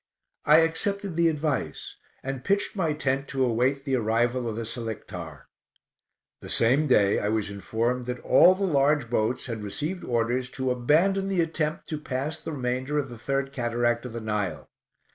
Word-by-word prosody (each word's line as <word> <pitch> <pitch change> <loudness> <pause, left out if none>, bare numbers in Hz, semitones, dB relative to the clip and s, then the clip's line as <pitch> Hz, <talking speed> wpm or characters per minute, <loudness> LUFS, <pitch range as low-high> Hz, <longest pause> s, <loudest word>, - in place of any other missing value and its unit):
I 155 +3 +7
accepted 195 +3 -1
the 170 0 +3
advice, 150 - -3 0.3
and 135 -1 -4
pitched 200 +2 0
my 165 -6 0
tent 135 -2 -1
to 135 -1 0
await 130 +4 +1
the 135 -2 +1
arrival 120 +2 0
of 110 - -4
the 115 0 -4
Selictar. 95 - -6 1.0
The - - -9
same 135 +7 +3
day 105 -6 +4
I 105 - -1
was 110 -2 -1
informed 115 +5 -2
that 125 0 -2
all 185 - +6
the 200 - -3
large 145 -6 +2
boats 120 +2 0
had 115 -3 -5
received 150 - -3
orders 120 +1 0
to 130 -1 0
abandon 165 +11 +2
the 190 -3 +1
attempt 160 -1 -2
to 155 - -3
pass 140 +2 -3
the - - -5
remainder 130 +2 -2
of 140 -2 -1
the 120 -2 -10
third 135 +2 -2
cataract 120 -2 0
of 115 - -10
the 115 - -5
Nile. 105 -9 -3
130 Hz, 175 wpm, -26 LUFS, 115-150 Hz, 1.0 s, I